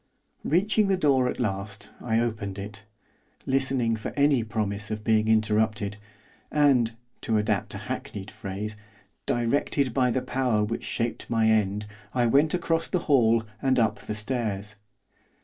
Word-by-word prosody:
Reaching 205 Hz, +5 st, +2 dB
the 195 Hz, -1 st, +2 dB
door 135 Hz, -6 st, +3 dB
at -, -, -5 dB
last, 100 Hz, -1 st, -3 dB
I 115 Hz, -2 st, +1 dB
opened 105 Hz, -4 st, -2 dB
it, 100 Hz, +1 st, -7 dB, 0.6 s
listening 130 Hz, -3 st, +1 dB
for 110 Hz, -, -5 dB
any 140 Hz, -4 st, +4 dB
promise 105 Hz, -1 st, -2 dB
of 105 Hz, -1 st, -4 dB
being 110 Hz, 0 st, +2 dB
interrupted 110 Hz, -1 st, +1 dB, 0.5 s
and 135 Hz, -6 st, +3 dB, 0.3 s
to 110 Hz, -2 st, +1 dB
adapt 105 Hz, -2 st, 0 dB
a -, -, -7 dB
hackneyed 100 Hz, 0 st, -5 dB
phrase 105 Hz, 0 st, -5 dB, 0.5 s
directed 125 Hz, +2 st, +1 dB
by 125 Hz, 0 st, +3 dB
the 125 Hz, +1 st, 0 dB
power 125 Hz, -4 st, +1 dB
which 110 Hz, +2 st, -3 dB
shaped 115 Hz, 0 st, -3 dB
my 115 Hz, -1 st, +3 dB
end, 105 Hz, -1 st, +1 dB, 0.3 s
I 120 Hz, -1 st, +3 dB
went 145 Hz, +8 st, +3 dB
across 165 Hz, -1 st, 0 dB
the -, -, 0 dB
hall 115 Hz, -6 st, +4 dB, 0.2 s
and 130 Hz, -1 st, +2 dB
up 110 Hz, -3 st, +2 dB
the 105 Hz, -, -5 dB
stairs. 105 Hz, -2 st, -3 dB
115 Hz, 150 wpm, -26 LUFS, 105-130 Hz, 0.6 s, any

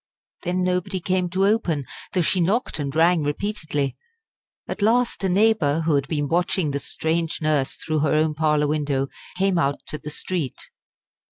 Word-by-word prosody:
Then 180 Hz, +1 st, -1 dB
nobody 185 Hz, +1 st, 0 dB
came 185 Hz, 0 st, 0 dB
to 190 Hz, +2 st, +1 dB
open, 180 Hz, -, +1 dB, 0.3 s
though 180 Hz, -, +2 dB
she 180 Hz, +3 st, +2 dB
knocked 200 Hz, +1 st, 0 dB
and 140 Hz, -1 st, -3 dB
rang 165 Hz, +1 st, +4 dB
repeatedly. 150 Hz, -3 st, -2 dB, 0.7 s
At -, -, -5 dB
last 235 Hz, +1 st, +2 dB
a 190 Hz, -, +2 dB
neighbour, 180 Hz, -6 st, +3 dB
who 160 Hz, -1 st, +1 dB
had 140 Hz, -1 st, +1 dB
been 145 Hz, -3 st, -1 dB
watching 170 Hz, -1 st, +1 dB
the 140 Hz, -, -1 dB
strange 160 Hz, +3 st, -2 dB
nurse 150 Hz, -3 st, +1 dB
through 155 Hz, -1 st, -2 dB
her 150 Hz, 0 st, +2 dB
own 155 Hz, 0 st, +2 dB
parlour 150 Hz, -1 st, +2 dB
window, 145 Hz, -2 st, 0 dB, 0.3 s
came 190 Hz, -2 st, +2 dB
out 140 Hz, -3 st, +1 dB
to 150 Hz, -, -4 dB
the 150 Hz, -, -7 dB
street. 155 Hz, -3 st, -3 dB
160 Hz, 170 wpm, -23 LUFS, 150-185 Hz, 0.7 s, rang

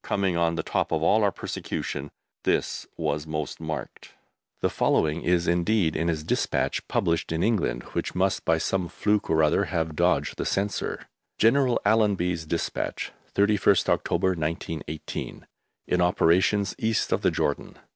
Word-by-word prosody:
Coming 95 Hz, -3 st, 0 dB
on 85 Hz, -1 st, +1 dB
the -, -, -2 dB
top -, -, -1 dB
of 80 Hz, -, 0 dB
all 105 Hz, +6 st, +4 dB
our 100 Hz, -, +3 dB
persecution, 75 Hz, -5 st, -4 dB, 0.3 s
this -, -, 0 dB
was 75 Hz, -1 st, -2 dB
most 75 Hz, -2 st, -4 dB
marked. 80 Hz, -4 st, -6 dB, 0.5 s
The -, -, +2 dB
following 80 Hz, +1 st, +1 dB
is 85 Hz, -1 st, +1 dB
indeed 85 Hz, 0 st, +2 dB
in 85 Hz, -, 0 dB
his 80 Hz, -2 st, -1 dB
despatch -, -, -1 dB
published 85 Hz, -1 st, 0 dB
in 80 Hz, +1 st, 0 dB
England, 90 Hz, -, 0 dB
which -, -, -3 dB
must 95 Hz, +1 st, +1 dB
by 80 Hz, -, +2 dB
some 90 Hz, +2 st, -1 dB
fluke 105 Hz, +4 st, 0 dB
or 80 Hz, -1 st, +3 dB
other 80 Hz, +6 st, +3 dB
have 80 Hz, -4 st, -2 dB
dodged -, -, +1 dB
the -, -, -2 dB
Censor: 100 Hz, +1 st, -2 dB, 0.3 s
GENERAL 125 Hz, +2 st, +3 dB
ALLENBY'S 95 Hz, -6 st, +2 dB
DESPATCH, 85 Hz, +1 st, -3 dB, 0.2 s
31ST 100 Hz, +1 st, +3 dB
OCTOBER, 95 Hz, -, +1 dB
1918. 80 Hz, -2 st, -4 dB, 0.4 s
In 90 Hz, -, +1 dB
operations 90 Hz, +3 st, +3 dB
east 110 Hz, 0 st, 0 dB
of -, -, +1 dB
the -, -, +3 dB
Jordan. 70 Hz, -, -2 dB
85 Hz, 150 wpm, -26 LUFS, 80-100 Hz, 0.5 s, all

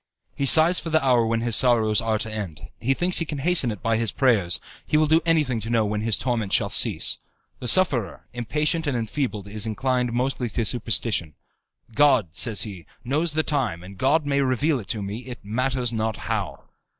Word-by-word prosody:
He 140 Hz, -, -1 dB
sighs 165 Hz, +5 st, +7 dB
for 165 Hz, -, -6 dB
the 160 Hz, -3 st, +1 dB
hour 120 Hz, -3 st, +3 dB
when 115 Hz, 0 st, -1 dB
his 115 Hz, -1 st, +1 dB
sorrows 115 Hz, -4 st, +3 dB
are 110 Hz, -1 st, 0 dB
to 110 Hz, +1 st, -4 dB
end; 95 Hz, -8 st, -7 dB
he 135 Hz, +4 st, 0 dB
thinks 180 Hz, +3 st, +2 dB
he 165 Hz, -, -2 dB
can 150 Hz, -1 st, -5 dB
hasten 160 Hz, -2 st, +2 dB
it 105 Hz, -3 st, -7 dB
by 115 Hz, -1 st, +1 dB
his 115 Hz, -1 st, 0 dB
prayers; 110 Hz, -10 st, +2 dB, 0.3 s
he 150 Hz, -, +1 dB
will 155 Hz, -, +3 dB
do 160 Hz, +2 st, +3 dB
anything 150 Hz, -8 st, +1 dB
to 110 Hz, +1 st, -6 dB
know 115 Hz, -2 st, +1 dB
when 105 Hz, 0 st, -2 dB
his 110 Hz, -1 st, 0 dB
torments 115 Hz, -6 st, 0 dB
shall -, -, 0 dB
cease. -, -, +2 dB, 0.4 s
The 125 Hz, -, -6 dB
sufferer, 120 Hz, -, +3 dB
impatient 150 Hz, +7 st, -1 dB
and 135 Hz, -4 st, -1 dB
enfeebled, 110 Hz, -3 st, -4 dB
is 105 Hz, +2 st, -2 dB
mostly -, -, -2 dB, 0.4 s
inclined 125 Hz, +3 st, -2 dB
to 120 Hz, -2 st, -2 dB
superstition. 105 Hz, -, -1 dB, 0.6 s
"God," 140 Hz, -, +3 dB
says 105 Hz, +4 st, +1 dB
he, 95 Hz, -7 st, -9 dB, 0.2 s
"knows 150 Hz, +6 st, -1 dB
the 155 Hz, +1 st, 0 dB
time, 120 Hz, -, -2 dB
and 100 Hz, +2 st, -11 dB
God 145 Hz, +9 st, +1 dB
may 140 Hz, -1 st, 0 dB
reveal 135 Hz, +2 st, 0 dB
it 105 Hz, -, -10 dB
to 110 Hz, -5 st, -2 dB
me, 100 Hz, +3 st, -5 dB
it 125 Hz, -2 st, -7 dB
matters 125 Hz, +2 st, -1 dB
not 110 Hz, -1 st, -2 dB
how." -, -, -4 dB
120 Hz, 205 wpm, -23 LUFS, 110-140 Hz, 0.6 s, sighs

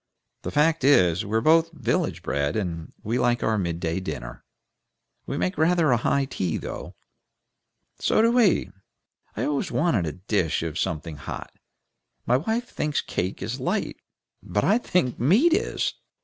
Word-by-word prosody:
The -, -, -4 dB
fact 155 Hz, +1 st, +2 dB
is, 95 Hz, -, +4 dB
we're 110 Hz, +2 st, +1 dB
both 165 Hz, +5 st, +4 dB
village 160 Hz, -, -1 dB
bred, 70 Hz, +1 st, -1 dB
and 85 Hz, -6 st, -3 dB
we 115 Hz, +4 st, -1 dB
like 120 Hz, 0 st, +2 dB
the 110 Hz, -, +1 dB
mid 85 Hz, -3 st, -2 dB
day 85 Hz, +1 st, -1 dB
dinner. -, -, -6 dB, 0.8 s
We 140 Hz, -, -3 dB
make 185 Hz, +3 st, -1 dB
rather 165 Hz, -2 st, +3 dB
a 120 Hz, -, +4 dB
high 135 Hz, +4 st, +1 dB
tea, 90 Hz, -, -2 dB
though." -, -, -7 dB, 1.0 s
"So -, -, +2 dB
do 230 Hz, -, +4 dB
we. 235 Hz, -6 st, +3 dB, 0.7 s
I -, -, -1 dB
always 145 Hz, -2 st, -1 dB
want 125 Hz, -, +1 dB
a -, -, -2 dB
dish 90 Hz, -3 st, -1 dB
of 80 Hz, -1 st, -3 dB
something 80 Hz, -1 st, -3 dB
hot. 75 Hz, -, -7 dB, 0.7 s
My 125 Hz, -, +3 dB
wife 220 Hz, -, -2 dB
thinks 150 Hz, -1 st, -2 dB
cake 95 Hz, +1 st, -3 dB
is 115 Hz, +7 st, -4 dB
light, 130 Hz, -, -2 dB, 0.4 s
but 100 Hz, +3 st, -1 dB
I 215 Hz, +4 st, +4 dB
think 175 Hz, -, 0 dB
meat 215 Hz, -, +4 dB
is." 430 Hz, +6 st, 0 dB
120 Hz, 160 wpm, -25 LUFS, -, 1.0 s, is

